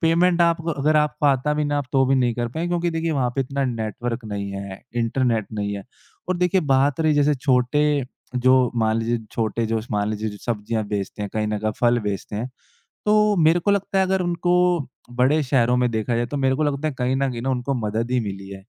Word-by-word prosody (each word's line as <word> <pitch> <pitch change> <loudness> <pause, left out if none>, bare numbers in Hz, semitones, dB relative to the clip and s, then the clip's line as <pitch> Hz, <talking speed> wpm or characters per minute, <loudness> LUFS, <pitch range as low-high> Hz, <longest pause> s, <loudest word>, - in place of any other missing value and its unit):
Payment 170 +2 +3
आपको 170 -1 +1
अगर 155 0 +1
आपको 150 0 +1
आता 140 +1 +2
भी 150 0 0
ना 145 0 0
आप 140 - -3
तो 135 -1 +4
भी 135 - +3
नहीं 125 -3 +2
कर 120 -1 -2
पाए। 160 +8 -3
क्योंकि 175 0 0
देखिए 165 0 -1
वहाँ 130 -4 0
पे 135 - 0
इतना 135 +1 -1
नेटवर्क 115 0 -3
नहीं 100 -1 -4
है 100 -1 -7 0.2
इंटरनेट 115 -2 0
नहीं 100 -1 -2
है। 100 - -8 0.4
और 185 - +1
देखिए 180 +1 +2
बात 135 +2 +2
रही 155 -1 +3
जैसे 145 0 +3
छोटे 130 +1 +2 0.5
जो 130 +1 +4 0.3
मान 110 0 +2
लीजिए 115 +1 0
छोटे 115 0 -1
जो 110 0 -1
स 110 - -11
मान 105 0 0
लीजिए 110 +1 -2
जो 105 - -7
सब्ज़ियाँ 110 -1 -2
बेचते 105 0 -3
हैं 100 - -3
कहीं 110 -1 0
न 105 0 -1
कहीं 110 +1 -1
फल 120 0 +4
बेचते 100 +1 -4
हैं 120 +4 -3 0.6
तो 210 0 +4
मेरे 165 +3 +5
को 200 +4 +1
लगता 200 -1 0
है 190 - +3
अगर 190 0 +1
उनको 175 0 0 0.6
बड़े 130 +6 +2
शहरों 125 -3 +2
में 125 0 +2
देखा 110 +2 -1
जाए 120 +1 0
तो 145 +4 -4
मेरे 135 -1 +2
को 155 - 0
लगता 145 +1 0
है 150 - -3
कहीं 125 +1 0
न 135 0 +1
कहीं 120 -1 -5
उनको 130 +2 -1
मदद 115 +4 -2
ही 125 - +2
मिली 100 -3 -5
है। 95 -1 -9
125 Hz, 235 wpm, -22 LUFS, 110-150 Hz, 0.6 s, मेरे